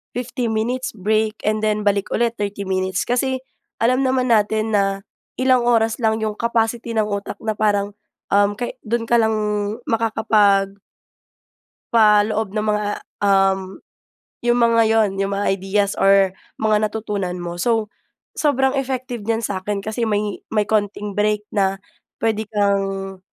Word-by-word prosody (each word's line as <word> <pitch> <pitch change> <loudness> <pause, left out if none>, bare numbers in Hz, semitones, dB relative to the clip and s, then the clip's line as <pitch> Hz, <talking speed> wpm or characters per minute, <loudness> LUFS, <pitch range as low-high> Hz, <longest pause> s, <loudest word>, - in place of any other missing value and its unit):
15 245 -1 -2
minutes 250 +4 -1
break, 215 +2 0
and 215 +1 +1
then 215 -1 +1
balik 200 0 +1
ulit, 235 0 +2
30 200 -1 -3
minutes. 185 0 -1
Kasi 260 +2 0 0.4
alam 255 +3 +3
naman 255 -1 +1
natin 215 0 +2
na 195 -1 0 0.4
ilang 255 -1 +3
oras 225 0 +2
lang 220 -1 +1
‘yong 215 -1 -2
capacity 235 0 0
ng 220 - +3
utak 200 -1 -4
na 220 - 0
parang, 205 -1 +1 0.4
um, 205 +1 +3
ka 240 +2 -3
doon 230 +1 -1
ka 235 - +4
lang 220 -1 +2 0.5
makakapag 215 -3 +2 1.2
paloob 215 -1 +3
ng 215 - 0
mga, 210 0 0 0.4
um, 195 -1 +2 0.6
'yong 240 0 +2
mga 230 -1 +4
'yon, 220 -2 +3
'yong 195 0 0
mga 200 - -1
ideas 195 +1 0
or 195 -1 +5 0.2
mga 215 0 +2
natutunan 205 -4 -3
mo. 175 -1 -6
So, 225 +1 0 0.5
sobrang 270 -3 +2
effective 255 -2 -3
niyan 230 0 0
sa’kin 200 0 -3
kasi 220 +2 -2
may 210 -1 -1
,may 215 -1 +1
konting 205 -1 -1
break 210 +1 0
na 195 -2 +1 0.5
puwede 220 -1 0
kang, 195 -2 -1
215 Hz, 145 wpm, -20 LUFS, 200-230 Hz, 1.2 s, or